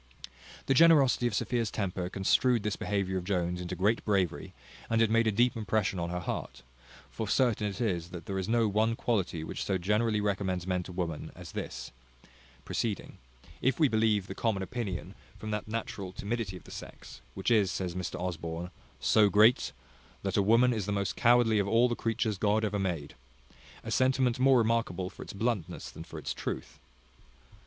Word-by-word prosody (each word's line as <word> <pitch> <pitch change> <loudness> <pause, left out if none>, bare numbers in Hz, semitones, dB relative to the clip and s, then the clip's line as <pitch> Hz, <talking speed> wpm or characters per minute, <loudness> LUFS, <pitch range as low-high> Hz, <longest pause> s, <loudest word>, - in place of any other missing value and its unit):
The 135 - +3
generosity 140 -5 +5
of 110 - -2
Sophia's 115 0 0
temper 90 -4 -3
construed 105 +5 +2
this 105 -2 -1
behaviour 95 -2 -1
of - - -8
Jones 90 -2 -1
into 90 +1 -4
great 105 +6 +1
bravery; 95 -5 0 0.4
and 115 - +2
it 115 -1 +3
made 115 0 +3
a - - +3
deep 120 +4 +2
impression 105 -3 0
on 85 0 -2
her 90 0 -3
heart: 65 -6 -5 0.5
for 110 - -4
certain 110 -2 +2
it 100 +1 -5
is, 90 -8 -1
that 85 -2 -8
there 95 -1 -2
is 95 +2 -3
no 115 -1 +3
one 110 +3 +1
quality 95 -9 -1
which - - -4
so 95 - 0
generally 105 +4 +1
recommends 95 -3 -1
men 90 -1 0
to 90 - -9
women 85 -4 -4
as - - -10
this; - - -6 0.7
proceeding, 110 -5 -3 0.4
if 130 +5 +1
we 155 - +6
believe 110 -4 +2
the 95 - -6
common 100 -2 -1
opinion, 110 0 -4 0.2
from 110 - -6
that 105 0 -3
natural 110 -4 -4
timidity 100 -1 -3
of - - -15
the - - -14
sex, - - -10
which 95 - -1
is, 105 -5 +4
says 90 -1 -3
Mr 90 0 -4
Osborne, 85 0 -4 0.3
"so 105 -2 +4
great, 110 +4 +5 0.5
that 100 +2 -1
a 100 - +4
woman 115 +5 +4
is 105 -4 -3
the - - -1
most 100 -1 -1
cowardly 120 -2 +4
of 100 - 0
all 115 +4 +4
the 120 - -1
creatures 110 -3 -1
God 105 +1 +2
ever 105 -1 -1
made;" 85 -7 -2 0.7
a - - -5
sentiment 130 -1 +2
more 130 0 +5
remarkable 110 -6 0
for - - -12
its - - -8
bluntness 110 -3 -2
than - - -9
for 85 -1 -10
its 75 - -4
truth. - - -5
105 Hz, 190 wpm, -30 LUFS, 95-115 Hz, 0.7 s, we